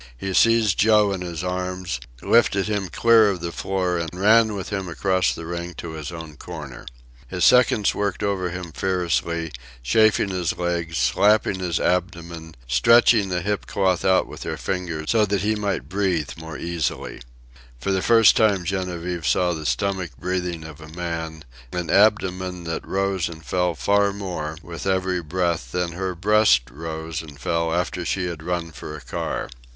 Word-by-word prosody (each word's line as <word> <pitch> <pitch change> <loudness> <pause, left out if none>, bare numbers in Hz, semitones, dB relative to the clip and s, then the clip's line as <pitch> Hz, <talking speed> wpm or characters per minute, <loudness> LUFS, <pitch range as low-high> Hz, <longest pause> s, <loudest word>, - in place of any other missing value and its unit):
He 95 +8 -4
seized 115 -2 +4
Joe 105 -1 +5
in 95 - -4
his 85 -1 -5
arms, 90 -5 -3 0.2
lifted 100 -4 +3
him 100 -3 -2
clear 115 +1 +5
of 95 -3 -2
the 85 0 -4
floor, 90 -1 -1
and 85 -1 -3
ran 110 +1 +5
with 95 - -5
him 95 -3 -3
across 95 +2 +1
the 85 - -6
ring 85 0 -5
to 85 - -7
his 80 -1 -6
own 80 -3 -9
corner. - - -9 0.4
His 90 +4 0
seconds 115 -3 +4
worked 100 -1 -2
over 95 -3 0
him 90 -1 -6
furiously, 85 -2 -1 0.3
chafing 110 - +3
his 90 -3 -2
legs, 85 -2 -2
slapping 105 -2 +3
his 90 -2 -1
abdomen, 85 -2 -2
stretching 115 - +5
the 90 -1 -1
hip 105 0 -2
cloth 95 -3 +1
out 95 0 +3
with - - -11
their - - -4
fingers 85 -4 -3
so 115 -2 +4
that 100 -2 0
he 105 +2 +1
might 105 -3 -2
breathe 95 -6 -1
more 80 -1 -8
easily. 85 -6 -3 0.6
For 80 - -2
the 95 -1 +1
first 115 0 +6
time 100 -5 +3
Genevieve 90 -3 -3
saw 90 -1 +2
the 80 -2 -4
stomach 90 +1 -2
breathing 90 0 -3
of 80 -1 -10
a 75 - -11
man, 80 -1 -5 0.3
an 90 -2 -2
abdomen 95 -3 +2
that 80 -1 -4
rose 95 -2 0
and 80 -2 -11
fell 90 -2 0
far 100 +9 +2
more 90 -6 -5
with 85 +2 -7
every 95 -1 0
breath 85 -6 -2
than 90 +2 -1
her 90 +1 -3
breast 100 - +3
rose 80 0 -5
and 75 -3 -12
fell 85 -1 -1
after 90 +1 -1
she 90 +1 -1
had 85 -3 -5
run 85 0 -3
for 75 0 -8
a - - -12
car. 65 - -4
90 Hz, 175 wpm, -23 LUFS, 85-100 Hz, 0.6 s, first